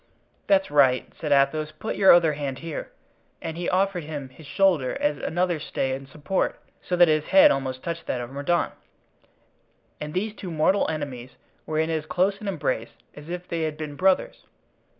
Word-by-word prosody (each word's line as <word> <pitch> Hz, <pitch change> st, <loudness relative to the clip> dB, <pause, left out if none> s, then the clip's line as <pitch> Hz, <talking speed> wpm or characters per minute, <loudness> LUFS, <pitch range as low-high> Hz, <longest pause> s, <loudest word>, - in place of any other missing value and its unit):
"That's 195 Hz, -5 st, +3 dB
right," 135 Hz, -3 st, +4 dB
said 150 Hz, -, -3 dB
Athos; 145 Hz, +2 st, +2 dB
"put 220 Hz, -, -4 dB
your 195 Hz, -1 st, +7 dB
other 165 Hz, -3 st, +5 dB
hand 140 Hz, -3 st, -4 dB
here." 165 Hz, -2 st, -6 dB, 0.5 s
And 160 Hz, -1 st, -5 dB
he 175 Hz, 0 st, -2 dB
offered 185 Hz, -2 st, +1 dB
him 145 Hz, -3 st, -6 dB
his 140 Hz, +3 st, -15 dB
shoulder 175 Hz, -10 st, +2 dB
as 145 Hz, -1 st, 0 dB
another 175 Hz, -1 st, 0 dB
stay 135 Hz, -2 st, -2 dB
and 135 Hz, 0 st, -6 dB
support, 150 Hz, +7 st, -2 dB, 0.2 s
so 180 Hz, -, -2 dB
that 175 Hz, 0 st, +6 dB
his 155 Hz, -1 st, +2 dB
head 290 Hz, +1 st, +7 dB
almost 130 Hz, -1 st, -3 dB
touched 170 Hz, 0 st, -5 dB
that 125 Hz, -, -1 dB
of 120 Hz, +1 st, -6 dB
Mordaunt; 145 Hz, +5 st, 0 dB, 1.3 s
and 150 Hz, +2 st, -6 dB
these 210 Hz, +3 st, -1 dB
two 195 Hz, -3 st, -8 dB
mortal 165 Hz, +5 st, +2 dB
enemies 135 Hz, -5 st, -5 dB, 0.3 s
were 155 Hz, -, -2 dB
in 160 Hz, +1 st, +1 dB
as 155 Hz, -1 st, -2 dB
close 195 Hz, +4 st, 0 dB
an 210 Hz, -, -6 dB
embrace 140 Hz, -, -2 dB, 0.2 s
as 150 Hz, +2 st, -12 dB
if 180 Hz, +1 st, -5 dB
they 165 Hz, -1 st, -3 dB
had 155 Hz, -1 st, -2 dB
been 150 Hz, -2 st, -6 dB
brothers. 185 Hz, +3 st, +1 dB
155 Hz, 185 wpm, -25 LUFS, 145-180 Hz, 1.3 s, your